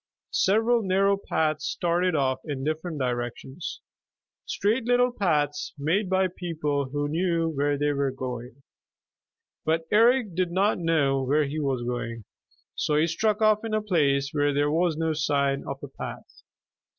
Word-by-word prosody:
Several 225 +4 +3
narrow 195 0 +2
paths 160 -5 -1
started 175 0 0
off 130 -2 +1
in 140 -3 -4
different 155 +2 -3
directions, 125 +4 -4 0.7
straight 225 +4 0
little 245 +1 +3
paths 150 - 0
made 175 +8 0
by 190 0 +3
people 155 -6 -2
who 145 +1 -2
knew 165 +1 0
where 145 -1 0
they 145 +1 +1
were 140 -1 0
going. 125 0 -6 1.0
But 165 +1 0
Eric 230 -1 +4
did 180 +1 0
not 195 +3 +2
know 150 -5 +2
where 145 +4 +2
he 145 +3 -4
was 135 -4 -1
going, 115 -2 -4 0.5
so 150 -2 0
he 155 +2 +4
struck 210 +6 0
off 215 0 +4
in 220 -1 -2
a - - +2
place 140 -8 +1
where 145 -1 +1
there 145 +1 +2
was 165 0 +1
no 160 0 0
sign 140 -2 0
of 135 - -4
a - - -5
path. 135 - -9
155 Hz, 155 wpm, -26 LUFS, 140-185 Hz, 1.0 s, Eric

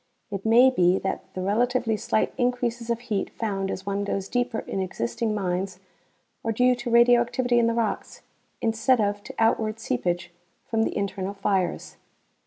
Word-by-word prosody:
It 200 +1 -3
may 245 +4 +7
be 180 -5 +3
that 190 - -4
the 185 - -3
relatively 230 +3 +1
slight 215 - 0
increases 245 -1 -1
of 235 0 -1
heat 215 -5 -2
found 195 -4 -3
as 190 - -5
one 200 0 -1
goes 195 -1 -2
deeper 245 -1 -1
in - - -4
existing 185 - -2
mines 185 -1 -2 0.6
are 225 - 0
due 250 +3 +4
to 240 0 -4
radioactivity 240 +1 +4
in 230 - +3
the 230 - 0
rocks 230 -3 -2 0.4
instead 225 +3 +2
of 205 -1 0
to - - -10
outward 225 -1 +1
seepage 175 - -2 0.3
from 225 -1 0
the - - -3
internal 200 0 -3
fires. 195 -2 -1
220 Hz, 165 wpm, -25 LUFS, 195-235 Hz, 0.6 s, may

